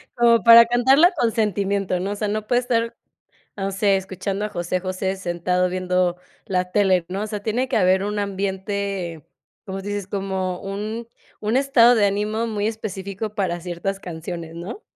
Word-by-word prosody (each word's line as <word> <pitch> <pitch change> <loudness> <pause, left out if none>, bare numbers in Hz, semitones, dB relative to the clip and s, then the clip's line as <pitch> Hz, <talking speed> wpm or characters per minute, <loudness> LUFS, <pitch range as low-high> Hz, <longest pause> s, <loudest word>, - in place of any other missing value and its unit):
Como 235 -1 +4
para 235 0 +10
cantarla 265 +9 +5
con 240 -9 0
sentimiento, 200 -3 0
¿no? 195 +2 -2
O - - -2
sea, 210 0 -2
no 215 0 -3
puede 245 0 +2
estar, 230 -1 -1 0.6
no 195 0 -2
sé, 195 0 +2
escuchando 190 +2 -3
a - - -2
José 175 0 -2
José 190 +1 -2
sentado 180 0 0
viendo 180 -1 0 0.3
la 180 -1 -1
tele, 190 -4 +3
¿no? 195 +3 -3
O - - -2
sea, 210 -1 -5
tiene 245 +4 -1
que 250 - 0
haber 190 +1 +3
un 210 0 -2
ambiente, 195 -4 -3 0.4
como 190 -1 -5
tu 195 - -10
dices, 205 -2 -3
como 190 -2 -3
un 215 +4 -5 0.3
un 215 +4 0
estado 255 -3 +5
de 210 -3 +3
ánimo 210 +3 0
muy 210 -2 -2
específico 210 -1 -5
para 175 -3 -1
ciertas 180 +3 -4
canciones, 165 -1 -7
¿no? 180 - -7
200 Hz, 175 wpm, -22 LUFS, 185-220 Hz, 0.6 s, para